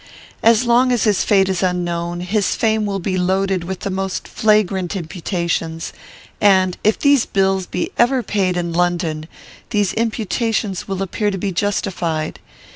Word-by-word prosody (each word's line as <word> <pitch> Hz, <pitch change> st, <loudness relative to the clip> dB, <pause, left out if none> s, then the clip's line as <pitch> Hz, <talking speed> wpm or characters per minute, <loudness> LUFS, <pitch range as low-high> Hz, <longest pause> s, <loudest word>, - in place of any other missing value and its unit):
As 230 Hz, +1 st, +4 dB
long 245 Hz, +2 st, +4 dB
as 245 Hz, -, +1 dB
his 210 Hz, -4 st, +2 dB
fate 195 Hz, -2 st, +3 dB
is 190 Hz, -2 st, -1 dB
unknown, 175 Hz, -1 st, -1 dB
his 195 Hz, +2 st, 0 dB
fame 220 Hz, -2 st, +1 dB
will 200 Hz, -1 st, -1 dB
be 185 Hz, 0 st, -2 dB
loaded 190 Hz, 0 st, +1 dB
with 190 Hz, +1 st, -5 dB
the 200 Hz, -, -3 dB
most 190 Hz, 0 st, -3 dB
flagrant 205 Hz, -4 st, +1 dB
imputations, 170 Hz, -2 st, -3 dB, 0.5 s
and, 190 Hz, -3 st, +4 dB
if 215 Hz, -, +3 dB
these 285 Hz, -3 st, +3 dB
bills 190 Hz, -1 st, +1 dB
be 180 Hz, -, -3 dB
ever 245 Hz, +1 st, +3 dB
paid 190 Hz, -5 st, 0 dB
in 170 Hz, -1 st, -2 dB
London, 170 Hz, -3 st, 0 dB, 0.4 s
these 205 Hz, -3 st, +1 dB
imputations 225 Hz, -2 st, -1 dB
will 195 Hz, -1 st, -2 dB
appear 205 Hz, +3 st, -1 dB
to 195 Hz, -, -3 dB
be 195 Hz, +1 st, -2 dB
justified. 175 Hz, -5 st, -2 dB
190 Hz, 155 wpm, -19 LUFS, 175-210 Hz, 0.5 s, As